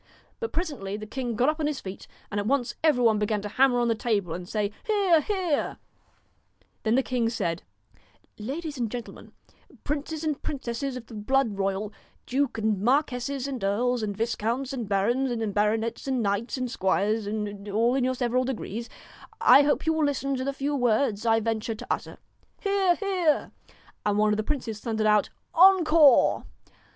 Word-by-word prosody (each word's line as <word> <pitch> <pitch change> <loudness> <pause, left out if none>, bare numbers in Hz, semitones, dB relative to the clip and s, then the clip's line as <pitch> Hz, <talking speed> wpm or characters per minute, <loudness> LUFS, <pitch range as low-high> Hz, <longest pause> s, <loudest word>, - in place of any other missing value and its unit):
But 460 - -3
presently 285 - -3
the 215 - -7
king 240 +1 -4
got 245 +5 +2
up 310 +1 +1
on 300 - 0
his 300 -3 -2
feet, 190 0 -8 0.2
and 205 - -1
at 205 - -2
once 265 -1 +1
every 295 -6 +3
one 220 -2 +4
began 210 0 0
to - - -3
hammer 255 +4 +3
on 240 -1 +2
the 230 - +3
table, 210 -6 -1
and 180 +1 -7
say' 210 -2 -1 0.2
Hear 405 -4 +1
1 325 -2 +7
hear 365 -5 0
I - - -2
1 - - -10 1.0
Then 220 +1 +1
the 265 - +3
king 245 -3 0
said: 175 -7 -2 0.8
'Ladies 290 +6 -5
and 235 -2 -1
gentlemen, 240 +1 -8 0.5
princes 300 +2 -3
and 305 -3 -2
princesses 260 -1 -4
of 240 - -9
the 230 - -13
blood 225 +1 0
royal, 195 +2 -1 0.3
dukes 265 -2 -1
and 215 -3 0
marquesses 265 +2 0
and 260 -6 -5
earls, 240 +5 +1
and 205 -2 -3
viscounts 235 +4 -1
and 235 -6 -4
barons, 235 +7 +1
and 225 -4 -2
baronets 220 +4 0
and 260 -3 0
knights 205 +6 -1
and 255 -2 -3
squires, 205 +2 0
and 205 -1 -4
all 230 +4 +2
in 265 -1 +1
your 255 0 +1
several 250 0 +1
degrees, 235 -3 -4 0.5
I 280 - +7
hope 290 +2 +1
you 320 - +3
will 315 -1 +1
listen 275 -1 -1
to 260 - -2
the 275 - -1
few 280 +1 -2
words 230 -3 +1
I 225 0 +4
venture 225 0 -2
to - - -10
utter.' - - -3 0.4
'Hear! 395 -3 +2
hear!' 365 -7 0 0.5
And 205 -1 +1
one 210 0 +3
of - - 0
the - - +1
princes 230 -5 -3
thundered 220 -1 -2
out 210 -1 +3 0.2
' - - -47
Encore 330 -6 +6
240 Hz, 190 wpm, -26 LUFS, 215-280 Hz, 1.0 s, 1